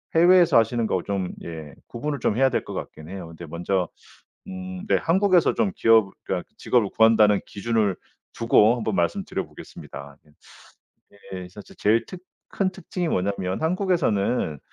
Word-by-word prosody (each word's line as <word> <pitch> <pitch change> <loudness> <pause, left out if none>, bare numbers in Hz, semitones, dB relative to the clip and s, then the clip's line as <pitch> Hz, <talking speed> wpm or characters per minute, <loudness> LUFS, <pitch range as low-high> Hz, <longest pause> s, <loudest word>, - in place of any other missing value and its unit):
해외에서 175 -3 +6
하시는 115 0 +2
거 95 - 0
좀 95 -3 -3
예 80 -4 -8
구분을 145 +4 -4
좀 110 - 0
해야 135 +1 +4
될 - - -1
것 - - -8
같긴 80 +1 -8
해요. 95 -2 -7
근데 85 +1 -10
먼저 90 +3 -2 0.6
음 185 0 -7
네 - - +4
한국에서 185 0 +3
좀 200 -4 0
기업 110 -3 +4
그러니까 - - -3
직업을 115 -5 +2
구한다는 110 -2 +5
기준을 105 -2 -1 0.4
두고 115 0 +4
한번 110 -3 -2
말씀드려보겠습니다. 70 -4 -5
예. 75 - -24 1.1
예. 90 -1 -7
사실 100 +2 -13
제일 110 +2 +2
특 185 - -9 0.3
큰 195 -2 +1
특징이 185 -1 -5
뭐냐면 95 - -1
한국에서는 155 - 0
110 Hz, 330 characters per minute, -24 LUFS, -, 1.1 s, 해외에서